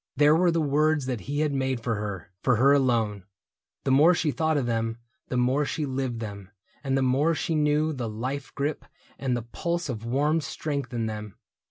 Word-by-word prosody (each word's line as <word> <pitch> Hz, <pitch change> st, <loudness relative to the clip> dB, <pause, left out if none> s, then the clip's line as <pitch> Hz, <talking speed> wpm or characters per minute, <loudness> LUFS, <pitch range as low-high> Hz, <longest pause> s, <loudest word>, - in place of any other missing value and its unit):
There 150 Hz, +1 st, +5 dB
were 175 Hz, +2 st, +4 dB
the 165 Hz, 0 st, +1 dB
words 150 Hz, 0 st, +2 dB
that 125 Hz, -3 st, -2 dB
he 145 Hz, +1 st, 0 dB
had 150 Hz, -2 st, +1 dB
made 130 Hz, -2 st, 0 dB
for 115 Hz, 0 st, -1 dB
her, 100 Hz, -4 st, -5 dB
For 125 Hz, -, +3 dB
her 135 Hz, +5 st, +5 dB
alone. 115 Hz, -7 st, +1 dB, 0.6 s
The 135 Hz, -, +1 dB
more 155 Hz, +7 st, +6 dB
she 160 Hz, -2 st, +1 dB
thought 160 Hz, +1 st, +1 dB
of 135 Hz, -, 0 dB
them 115 Hz, -1 st, -1 dB, 0.3 s
The 125 Hz, -, -2 dB
more 130 Hz, +4 st, +2 dB
she 150 Hz, +1 st, -2 dB
lived 130 Hz, -3 st, -2 dB
them, 100 Hz, -3 st, -7 dB, 0.3 s
and 135 Hz, -1 st, +1 dB
the 135 Hz, -, +2 dB
more 140 Hz, +6 st, +2 dB
she 165 Hz, -, -2 dB
knew 150 Hz, +1 st, +2 dB
The 125 Hz, -5 st, -3 dB
life 130 Hz, +6 st, -4 dB
grip 145 Hz, +2 st, -2 dB, 0.4 s
and 130 Hz, -3 st, 0 dB
the 120 Hz, -, -4 dB
pulse 170 Hz, +7 st, -3 dB
of 115 Hz, -3 st, -4 dB
warm 145 Hz, +7 st, +1 dB
strength 140 Hz, -4 st, -4 dB
in 115 Hz, -2 st, -1 dB
them. 105 Hz, -2 st, -5 dB
135 Hz, 205 wpm, -26 LUFS, 115-150 Hz, 0.6 s, more